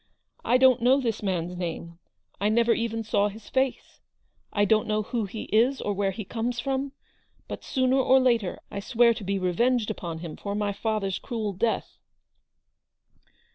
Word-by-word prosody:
I 250 - +4
don't 260 -2 +5
know 255 +3 +5
this 230 -5 -2
man's 180 -3 -2
name; 170 -1 -5 0.4
I 205 +2 +2
never 235 +1 +3
even 225 -1 -2
saw 205 -1 +2
his 220 +2 -12
face; 265 -1 -1 0.5
I 205 0 +2
don't 215 +1 +2
know 215 0 0
who 225 +1 -2
he 215 +3 -6
is, 245 +5 +3
or 205 - -1
where 200 0 0
he 195 +2 -5
comes 235 +2 -3
from; 270 0 -2 0.5
but - - -7
sooner 260 0 +1
or 265 0 +5
later 235 -7 +1
I - - -4
swear 235 +3 +3
to 225 - -8
be 195 +1 -1
revenged 215 +6 +1
upon 170 -3 -5
him 165 -1 -7
for 200 0 -4
my 205 -1 -1
father's 200 -2 -2
cruel 220 -5 -3
death." 225 +5 -2
220 Hz, 175 wpm, -26 LUFS, 200-245 Hz, 0.5 s, don't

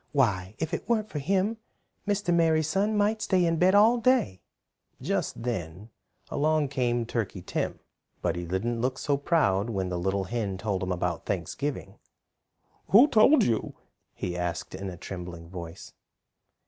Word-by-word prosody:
Why, 105 -8 +1
if 160 +1 -3
it 170 - -4
weren't 215 -2 +1
for 150 - -3
him 195 +8 0 0.5
Mr. 205 -3 +1
Merry 165 -2 +3
Sun 200 +7 0
might 210 +1 +1
stay 185 -4 +2
in 165 -1 +1
bed 185 +4 +4
all 225 +4 +6
day." 230 - +2 0.6
Just - - -2
then 100 -2 -4 0.4
along 155 0 +1
came 120 -3 0
Turkey 110 -6 -3
Tim, - - -3 0.4
but 85 -2 -1
he 85 - -4
didn't 115 +7 -2
look 130 +1 -1
so 145 - 0
proud 130 - +1
when 95 -4 -2
the 90 -1 -2
little 95 +2 0
hen 100 -1 -3
told 100 -2 -2
him 95 0 -2
about 90 -1 -2
Thanksgiving. 125 - -3 0.9
"Who 245 +9 +7
told 250 +7 +6
you?" 115 -2 -1 0.4
he 90 - -4
asked 90 -1 -3
in 95 0 -5
a 90 - -8
trembling 90 -2 -8
voice. 85 -2 -8
120 Hz, 160 wpm, -27 LUFS, -, 0.9 s, Who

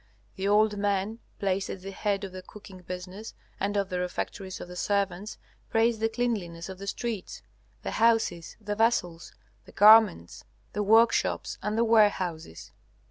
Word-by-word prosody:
The 190 +1 -2
old 210 0 +3
men 205 +2 -1 0.2
placed 195 0 -1
at 185 - -7
the 195 - -6
head 200 0 -2
of 195 - -5
the 185 0 -8
cooking 195 -1 -13
business 185 +4 -8 0.2
and 205 +1 -1
of 200 -1 0
the 180 -2 -2
refectories 185 +1 -4
of - - -8
the 180 - -10
servants 200 +1 -1 0.3
praise 225 0 +2
the 225 0 +1
cleanliness 200 -8 -3
of 190 -1 -8
the 200 - -8
streets, 225 -1 -4 0.4
the - - -3
houses, 225 -7 +1
the 205 -1 -4
vessels, 190 -7 0 0.3
the - - -15
garments, 210 - +5 0.3
the 210 - -1
workshops, 225 +3 +2
and 210 +1 -2
the 230 - +3
warehouses. 185 - +1
200 Hz, 160 wpm, -27 LUFS, 185-220 Hz, 0.4 s, garments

